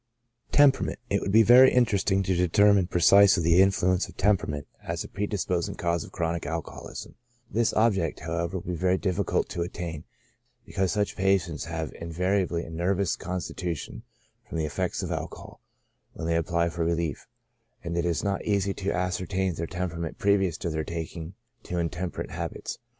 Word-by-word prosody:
Temperament, 145 -2 +4
— - - -36
It 100 - +2
would 100 - -2
be 110 +2 +7
very 125 +4 +8
interesting 100 -5 +2
to 95 - 0
determine 95 +2 +4
precisely 95 +1 +5
the 85 +3 +5
influence 95 -1 +2
of - - -15
temperament 80 -8 +1 0.2
as - - -4
a - - -8
predisposing 100 -4 -2
cause 85 -2 -1
of - - -12
chronic 85 -2 -2
alcoholism; 80 +1 -6 0.4
this 115 0 +2
object, 100 -7 +1
however, 85 +3 -2
would 85 - -8
be 90 - -3
very 90 +2 +1
difficult 95 -3 0
to 85 - -4
attain, 85 -2 -5 0.6
because 95 -3 -1
such 105 +2 -1
patients 95 -5 +1
have 80 -2 -4
inva 85 -1 -8 0.3
riably 85 0 -3
a 80 - -10
nervous 90 +3 0
constitution, 85 -7 -5 0.5
from - - -4
the 80 - 0
effects 75 - -2
of - - -4
alcohol, - - -6 0.5
when - - -6
they 85 0 +1
apply 85 +1 +1
for 85 0 -3
relief, 85 -3 -2 0.6
and 85 0 -4
it 85 - +1
is 85 -2 0
not 100 -1 -1
easy 100 -2 0
to 100 +1 -2
ascertain 90 +1 -1
their 85 0 -4
temperament 85 -2 -4
previous 95 -5 +2
to 85 - -3
their 80 0 -2
taking 85 +2 -6 0.3
to 90 - -5
intemperate 85 +1 -3
habits. - - -5
90 Hz, 170 wpm, -27 LUFS, 85-95 Hz, 0.6 s, very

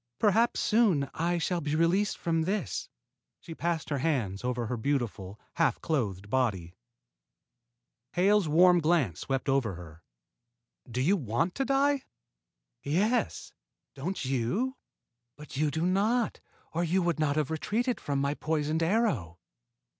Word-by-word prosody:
Perhaps 225 +3 +3
soon 205 -11 +3
I 175 +2 0
shall 170 +1 -1
be 150 +1 -1
released 180 +5 +2
from 165 -1 0
this." 195 +6 -2 0.5
She 165 - -9
passed 165 -1 -2
her 140 - 0
hands 120 -10 -1
over 125 -1 -1
her 125 - -2
beautiful, 110 -6 -2 0.2
half - - +2
clothed 105 - -2
body. 105 -8 -1 1.4
Hale's 195 0 +3
warm 175 +3 +6
glance 155 - +1
swept 135 -1 -2
over 135 -8 +1
her. 85 -1 -12 0.9
"Do 125 +2 -2
you 175 +10 +3
want 140 - -1
to 270 - -1
die?" 275 +1 +2 0.8
"Yes; 210 - 0 0.4
don't 150 +4 -4
you? 135 - -1 0.6
But 150 -1 -11
you 150 +1 +2
do 160 +4 -1
not, 215 +6 +1 0.3
or 170 +2 0
you 180 +2 +1
would 170 -2 0
not 145 -2 +1
have 155 -1 0
retreated 230 +10 -1
from 140 -1 -2
my 140 +1 0
poisoned 155 +1 -1
arrow." 165 - 0
160 Hz, 140 wpm, -29 LUFS, 130-185 Hz, 1.4 s, warm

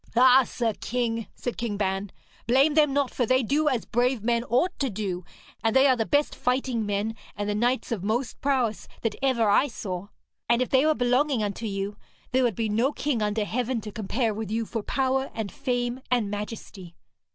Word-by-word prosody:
'Ah, 255 +2 +7
sir 230 -1 -1
king,' 230 -2 -1
said 245 - -4
King 230 -4 -2
Ban, 195 -1 -1 0.4
'blame 270 +5 +4
them 300 -2 +4
not, 280 -1 +1
for 245 - 0
they 255 +2 +3
do 295 +7 +1
as 250 -5 -1
brave 245 -1 +1
men 235 0 +1
ought 295 +12 +1
to 275 - +1
do, 190 -4 -3 0.4
and 225 +1 +1
they 265 +1 +6
are 260 -2 +5
the 225 -2 -1
best 290 +1 +2
fighting 250 -3 -1
men 205 +2 -1 0.2
and 205 0 -2
the 210 - 0
knights 245 +5 0
of 210 -6 -2
most 230 +5 -2
prowess 255 -6 0 0.2
that 225 -3 0
ever 255 -5 +2
I 205 +7 +4
saw. 190 -6 -5 0.4
And 235 0 +4
if 255 - 0
they 270 +3 +4
were 310 - +3
belonging 250 0 +2
unto 210 +2 -3
you, 200 0 -3 0.3
there 260 +1 +3
would 240 -5 +1
be 225 +2 -1
no 230 +6 +1
king 285 -6 -1
under 210 0 0
heaven 245 +2 -1
to 210 0 -7
compare 220 +2 -1
with 215 -1 -5
you 225 +1 -1
for 225 0 -3
power 265 +3 0
and 215 -4 -3
fame 245 +1 -2
and 235 -5 +1
majesty.' 205 -4 -7
235 Hz, 205 wpm, -26 LUFS, 210-260 Hz, 0.4 s, Ah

